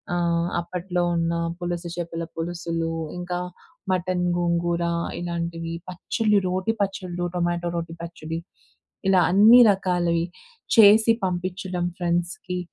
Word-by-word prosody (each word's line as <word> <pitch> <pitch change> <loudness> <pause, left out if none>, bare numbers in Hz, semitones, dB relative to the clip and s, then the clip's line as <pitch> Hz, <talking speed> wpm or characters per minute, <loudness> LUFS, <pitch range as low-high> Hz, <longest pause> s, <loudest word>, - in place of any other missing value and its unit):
ఆహ్, 170 0 +1
అప్పట్లో 180 0 -2
ఉన్న 165 0 0 0.3
పులుస 175 0 -3
చేపల 165 -1 -4
పులుసులు. 165 -1 -3 0.3
ఇంకా 175 0 -3 0.5
మటన్ 180 0 0
గోంగూర 170 0 0 0.4
ఇలాంటివి. 170 -1 -3
పచ్చళ్ళు, 210 +4 +1
రోటి 185 +5 0
పచ్చళ్ళు, 185 -3 -4
టొమాటో 175 0 0
రోటి 165 0 -5
పచ్చడి 165 -1 -5 0.7
ఇలా 185 -2 +5
అన్ని 220 +6 +8
రకాలవి 175 -3 0 0.5
చేసి 220 +1 +8
పంపించడం 180 0 -2
ఫ్రెండ్స్‌కి. 175 +1 -2
175 Hz, 105 wpm, -24 LUFS, 170-185 Hz, 0.7 s, అన్ని